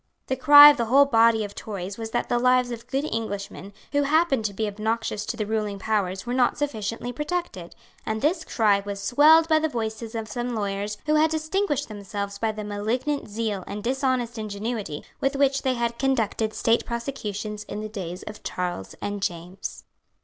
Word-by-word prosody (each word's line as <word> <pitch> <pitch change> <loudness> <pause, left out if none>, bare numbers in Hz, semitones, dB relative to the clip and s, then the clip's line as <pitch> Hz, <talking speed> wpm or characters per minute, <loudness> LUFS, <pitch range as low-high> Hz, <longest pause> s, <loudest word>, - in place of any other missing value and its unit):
The 260 - -1
cry 290 +2 +10
of 290 - -3
the 235 - 0
whole 275 +5 +6
body 230 -4 +4
of 205 -1 -6
Tories 200 -1 -6
was 225 -1 -4
that 240 - -1
the 240 - +1
lives 250 0 +3
of 235 -1 -7
good 275 +2 -1
Englishmen 205 -5 -4 0.2
who 285 - +2
happened 285 -4 +2
to 205 - -1
be 220 - -1
obnoxious 215 0 -2
to 235 - -3
the 215 - -1
ruling 210 -1 -2
powers 195 -3 -1
were 245 - -3
not 250 -1 +2
sufficiently 240 -3 -3
protected; 295 - -4 0.3
and 220 0 -2
this 320 +6 +1
cry 210 -8 +2
was 200 0 -5
swelled 300 +10 +5
by 315 -1 +4
the 315 0 0
voices 225 -2 -4
of 225 -1 -3
some 240 +1 -3
lawyers 205 0 -3
who 305 - +1
had 315 +1 +4
distinguished 315 -1 -1
themselves 200 -1 -5
by 225 -1 0
the 215 0 -6
malignant 225 +8 -2
zeal 210 -3 -2
and 205 +1 -6
dishonest 255 -2 -1
ingenuity 210 -5 -4 0.2
with 270 +1 0
which 275 0 +2
they 260 -1 0
had 235 0 -2
conducted 225 -5 0
State 230 +1 +2
prosecutions 215 -4 -4
in 210 - -6
the 215 - -4
days 185 -4 -6
of 210 - -9
Charles 175 - -4
and 205 0 -3
James. 175 +1 -5
225 Hz, 190 wpm, -25 LUFS, 205-265 Hz, 0.3 s, cry